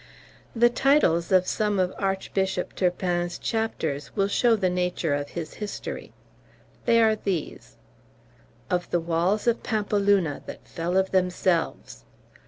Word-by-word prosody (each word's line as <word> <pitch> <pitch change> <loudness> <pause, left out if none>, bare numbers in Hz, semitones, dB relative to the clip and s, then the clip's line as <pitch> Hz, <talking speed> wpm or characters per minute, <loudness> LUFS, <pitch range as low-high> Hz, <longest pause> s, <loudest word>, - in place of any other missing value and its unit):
The 240 +1 +5
titles 240 - +3
of 185 -1 +5
some 210 +1 0
of 185 0 +1
Archbishop 190 -1 -1
Turpin's 175 -1 -1
chapters 155 - -3
will 195 0 +2
show 235 +2 +3
the 195 -4 +1
nature 180 -3 0
of 145 0 -2
his 160 -2 -5
history. 210 -1 -6 0.7
They 230 - +4
are 220 -1 +4
these: 165 - -4 0.9
"Of 180 -1 -1
the 175 - +1
Walls 170 +5 0
of 235 -1 +2
Pampeluna, 200 - +1
that - - -9
fell 175 +2 -2
of 190 0 +1
themselves." 180 - 0
185 Hz, 130 wpm, -25 LUFS, 170-210 Hz, 0.9 s, The